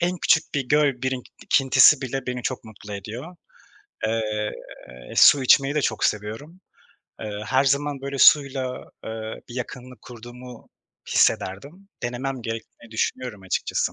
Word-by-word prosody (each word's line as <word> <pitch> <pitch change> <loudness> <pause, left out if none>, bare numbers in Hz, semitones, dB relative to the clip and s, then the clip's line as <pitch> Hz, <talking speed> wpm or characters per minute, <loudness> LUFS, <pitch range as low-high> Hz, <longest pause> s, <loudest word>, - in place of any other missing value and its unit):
en 175 +1 0
küçük 160 -1 +2
bir 135 -3 -1
göl 145 -4 +2
birikintisi 130 +2 +3
bile 135 0 -4
beni 125 -1 -3
çok 130 - -3
mutlu 105 -1 -10
ediyor. 120 - -8 0.7
Eee, 110 -1 -1 0.6
su 140 - +7
içmeyi 135 +2 +4
de 150 - +1
çok 110 -4 -1
seviyorum. 110 - -3 0.6
Eee, 105 -1 -5
her 130 +3 +2
zaman 140 +1 0
böyle 140 0 -5
suyla, 135 -3 +4 0.2
eee, 110 0 -6
bir 120 - -10
yakınlık 125 0 -7
kurduğumu 120 0 -12 0.4
hissederdim. 145 - 0
Denemem 125 +1 -3
gerektiğini 115 0 -7
düşünüyorum 115 -2 -3
açıkçası. 95 - -1
125 Hz, 130 wpm, -24 LUFS, 110-140 Hz, 0.7 s, su